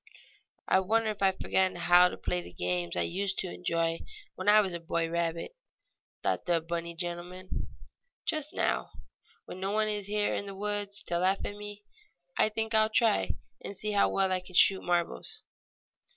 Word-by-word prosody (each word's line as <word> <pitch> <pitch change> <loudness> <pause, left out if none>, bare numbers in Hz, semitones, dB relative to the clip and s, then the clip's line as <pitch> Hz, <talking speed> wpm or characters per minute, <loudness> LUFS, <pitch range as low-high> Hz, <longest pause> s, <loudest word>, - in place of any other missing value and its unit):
"I 190 - +5
wonder 220 +3 +1
if 210 - -9
I 195 - +5
have 190 0 0
forgotten 190 -1 +1
how 175 +1 +6
to - - -7
play 90 -1 -1
the 85 0 -11
games 90 -1 -2
I 85 - +2
used 190 - -2
to 185 - -2
enjoy 165 -2 0 0.3
when 185 +2 -1
I 210 +1 +8
was 195 -4 +1
a 170 - -3
boy 165 0 -1
rabbit?" 170 - -2 0.7
thought - - -1
the 170 -1 +3
bunny 170 +1 -4
gentleman. 175 +2 -5 0.6
"Just 305 -1 -1
now, - - 0 0.6
when 185 - -8
no 190 +1 -1
one 215 +1 +1
is 205 -2 -2
here 210 0 +1
in 200 - -2
tile 195 -1 -7
woods 205 0 -2
to 170 - -1
laugh 190 +2 +1
at 205 - -4
me, 205 0 -8 0.5
I - - +3
think 220 +1 -2
I'll 220 0 +4
try 215 - +2 0.3
and 200 - -6
see 210 - -2
how 200 -1 +4
well 190 -1 +1
I 185 - +2
can 180 0 -11
shoot 190 +1 +6
marbles." 175 - -2
190 Hz, 190 wpm, -30 LUFS, 170-205 Hz, 0.7 s, I